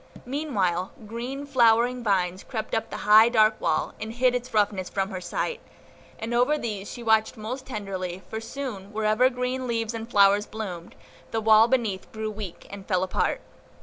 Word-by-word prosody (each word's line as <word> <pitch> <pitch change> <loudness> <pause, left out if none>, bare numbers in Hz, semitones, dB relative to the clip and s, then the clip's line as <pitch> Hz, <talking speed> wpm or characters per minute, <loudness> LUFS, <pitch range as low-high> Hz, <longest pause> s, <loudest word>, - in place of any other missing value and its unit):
Meanwhile, 200 - -1
green, 245 +6 -5
flowering 245 -2 +3
vines 185 -3 0
crept 220 -4 -5
up 225 - -1
the - - -5
high, 215 +2 +8
dark 215 -2 +3
wall, 155 - 0
and 220 +1 -5
hid 250 +1 +3
its 250 0 -3
roughness 205 -4 +1
from 195 0 -2
her 185 -1 -5
sight; 320 - -3 0.6
and 225 +2 -4
over 250 +6 +3
these 205 -6 -5
she 240 - -8
watched 220 +1 +2
most 250 +5 -6
tenderly, 190 -6 -5
for 220 - -5
soon, 225 -6 -6
wherever 215 +4 +3
green 250 0 -3
leaves 230 -1 -1
and 225 0 -6
flowers 200 -1 +4
bloomed, 185 -6 -7 0.3
the 225 - -1
wall 220 0 +6
beneath 230 -7 -1
grew 220 0 -4
weak, 205 -4 -8
and 200 -1 -9
fell 185 -3 +1
apart. 185 - 0
220 Hz, 175 wpm, -26 LUFS, 200-245 Hz, 0.6 s, high